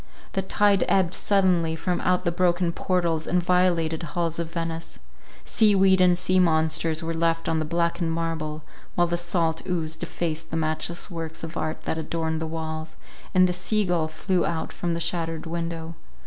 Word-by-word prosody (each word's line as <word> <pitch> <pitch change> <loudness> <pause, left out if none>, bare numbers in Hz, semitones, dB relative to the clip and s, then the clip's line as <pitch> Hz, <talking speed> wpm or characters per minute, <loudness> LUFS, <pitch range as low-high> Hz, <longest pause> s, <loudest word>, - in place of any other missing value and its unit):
The 195 - 0
tide 200 +1 +3
ebbed 185 -2 +2
sullenly 180 -5 +2
from 175 +2 -1
out 180 0 +1
the 170 - +2
broken 175 0 +2
portals 170 -3 0
and 180 - +2
violated 175 -3 +2
halls 170 0 -2
of 170 -1 -2
Venice: 165 -1 -4 0.5
sea 215 -2 +4
weed 190 -1 +5
and 180 -1 +5
sea 185 +1 +2
monsters 160 -1 +2
were 165 0 -2
left 165 0 0
on 160 - +1
the 155 - -1
blackened 170 +1 0
marble, 160 -2 -3 0.3
while 175 - +4
the 170 0 -1
salt 170 -2 0
ooze 160 -3 -1
defaced 160 0 -3
the 165 - -2
matchless 160 +4 -2
works 165 -1 -6
of 165 +1 -6
art 155 -1 -3
that 160 - -2
adorned 160 0 -2
their 160 - -2
walls, 160 0 -5 0.4
and 185 0 +6
the 180 - -1
sea 205 +4 0
gull 170 -3 +1
flew 175 +4 0
out 165 -1 -2
from 170 -1 -2
the - - -2
shattered 165 -1 -2
window. 165 0 -4
170 Hz, 180 wpm, -25 LUFS, 160-180 Hz, 0.5 s, and